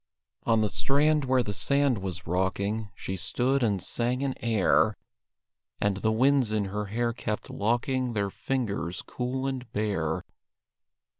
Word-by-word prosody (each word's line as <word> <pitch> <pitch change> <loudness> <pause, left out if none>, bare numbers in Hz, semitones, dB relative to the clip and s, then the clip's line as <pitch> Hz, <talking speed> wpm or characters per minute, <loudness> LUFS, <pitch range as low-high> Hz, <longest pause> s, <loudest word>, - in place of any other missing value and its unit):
On 115 -1 +4
the 105 - +3
strand 150 +4 +2
where 130 -1 +3
the 105 - -3
sand 140 -1 +2
was 95 -3 -5
rocking 100 +5 -1
She 95 - -4
stood 130 +8 +1
and 105 -5 +2
sang 125 +3 0
an 135 -1 0
air; 110 -2 +3 0.8
And 100 -1 +1
the 110 +3 +1
winds 130 0 +3
in 105 -2 +1
her 105 +2 -3
hair 115 +3 -1
kept 110 -2 -4
locking 120 +3 0
Their 100 -2 -1
fingers 105 -10 -2
cool 130 +2 -3
and 130 -3 -4
bare. 95 -7 -1
115 Hz, 145 wpm, -28 LUFS, 100-130 Hz, 0.8 s, On